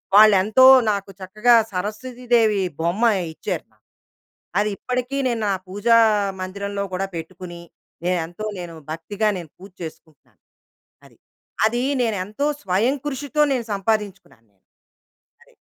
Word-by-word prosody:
వాళ్ళెంతో 215 Hz, +4 st, +6 dB, 0.3 s
నాకు 200 Hz, -1 st, -4 dB
చక్కగా, 215 Hz, +6 st, +2 dB, 0.2 s
సరస్వతి 215 Hz, +7 st, -5 dB
దేవి 220 Hz, -4 st, +4 dB, 0.2 s
బొమ్మ 175 Hz, +8 st, -1 dB, 0.3 s
ఇచ్చారు. -, -, -4 dB, 0.9 s
అది 210 Hz, -, +1 dB
ఇప్పటికి 250 Hz, +2 st, -3 dB
నేను 225 Hz, -3 st, -1 dB
ఆ -, -, 0 dB
పూజా 205 Hz, +5 st, +3 dB, 0.4 s
మందిరంలో 200 Hz, +2 st, -4 dB
కూడా 195 Hz, +1 st, -1 dB
పెట్టుకుని, 175 Hz, +1 st, -8 dB, 0.4 s
నేనెంతో 175 Hz, +3 st, -2 dB
నేను 170 Hz, -1 st, -7 dB, 0.2 s
భక్తిగా 205 Hz, +6 st, -1 dB
నేను 170 Hz, -4 st, -8 dB
పూజ 195 Hz, +1 st, -13 dB
చేసుకుంటున్నాను. 160 Hz, -2 st, -12 dB, 0.6 s
అది. -, -, -20 dB, 0.5 s
అది 240 Hz, +2 st, -1 dB, 0.2 s
నేను 220 Hz, -4 st, -1 dB
ఎంతో 215 Hz, +9 st, -2 dB, 0.2 s
స్వయం 205 Hz, +9 st, +1 dB
కృషితో 290 Hz, +2 st, -2 dB
నేను 245 Hz, -3 st, -2 dB
సంపాదించుకున్నాను. 195 Hz, -, -3 dB, 0.9 s
అది. -, -, -26 dB
205 Hz, 115 wpm, -22 LUFS, 185-230 Hz, 0.9 s, వాళ్ళెంతో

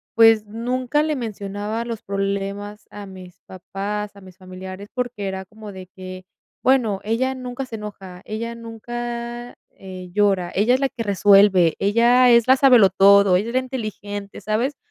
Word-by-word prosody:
pues, 225 Hz, -2 st, +6 dB
nunca 250 Hz, +6 st, -1 dB
le 310 Hz, -1 st, -1 dB
mencionaba 210 Hz, -2 st, -4 dB
los 230 Hz, -2 st, -6 dB
problemas 200 Hz, +1 st, -4 dB
a 205 Hz, -1 st, -9 dB
mis 185 Hz, -2 st, -12 dB
papás, 200 Hz, +3 st, -5 dB
a 200 Hz, -, -14 dB
mis 185 Hz, -1 st, -15 dB
familiares, 185 Hz, +1 st, -9 dB
porque 245 Hz, -5 st, -3 dB
era 190 Hz, 0 st, -4 dB
como 215 Hz, +2 st, -11 dB
de 185 Hz, -1 st, -10 dB
que: 185 Hz, 0 st, -10 dB, 0.4 s
"Bueno, 240 Hz, -7 st, +2 dB
ella 235 Hz, +5 st, 0 dB
nunca 255 Hz, +1 st, -6 dB
se 245 Hz, -, -8 dB
enoja, 195 Hz, -4 st, -9 dB
ella 230 Hz, +2 st, -5 dB
nunca, 240 Hz, +1 st, -6 dB, 0.2 s
eh, 185 Hz, -1 st, -10 dB
llora, 195 Hz, -4 st, +1 dB
ella 220 Hz, +6 st, +3 dB
es -, -, -1 dB
la 275 Hz, -1 st, 0 dB
que 240 Hz, -, -7 dB
resuelve, 195 Hz, -4 st, +4 dB
ella 235 Hz, +5 st, +4 dB
es 235 Hz, -1 st, +5 dB
la 260 Hz, -, +7 dB
sabelotodo, 200 Hz, -6 st, +6 dB
ella 205 Hz, +5 st, -2 dB
es -, -, -6 dB
la 255 Hz, -, +3 dB
inteligente", 210 Hz, -5 st, -6 dB
¿sabes? 235 Hz, +7 st, -1 dB
210 Hz, 160 wpm, -21 LUFS, 195-240 Hz, 0.4 s, la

